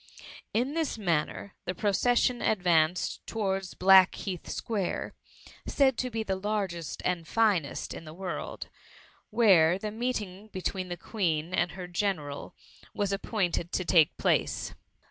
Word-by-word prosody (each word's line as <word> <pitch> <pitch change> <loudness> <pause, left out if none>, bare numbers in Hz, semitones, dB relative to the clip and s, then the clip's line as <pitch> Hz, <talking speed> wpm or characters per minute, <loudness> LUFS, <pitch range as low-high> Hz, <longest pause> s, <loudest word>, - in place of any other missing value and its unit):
In 250 +6 0
this 320 -6 -1
manner 175 0 -1
the 185 - -3
procession 240 +5 +2
advanced 175 -4 +2
to - - -7
wards 195 -3 -1
Blackheath 190 -1 +4
Square, 205 -6 -2 0.5
said 265 -2 +3
to 255 - -1
be 225 -2 -2
the 195 -3 -1
largest 190 -5 -3
and 175 -3 -1
finest 200 - +1
in - - -8
the 155 -1 -10
world, 185 -1 -5 0.6
where 185 -7 +5
the 210 +2 -4
meeting 215 -4 -3
be 200 -3 -7
^ - - -17
tween 185 -2 -2
the 175 - -4
Queen 170 -4 -1
and 175 -2 +1
her 180 0 -6
general 175 -6 -3 0.4
was 205 -2 0
appoint 195 -3 0
ed 170 +1 -8
to 185 - 0
take 165 -4 +4
place. - - 0
190 Hz, 145 wpm, -29 LUFS, 175-215 Hz, 0.6 s, where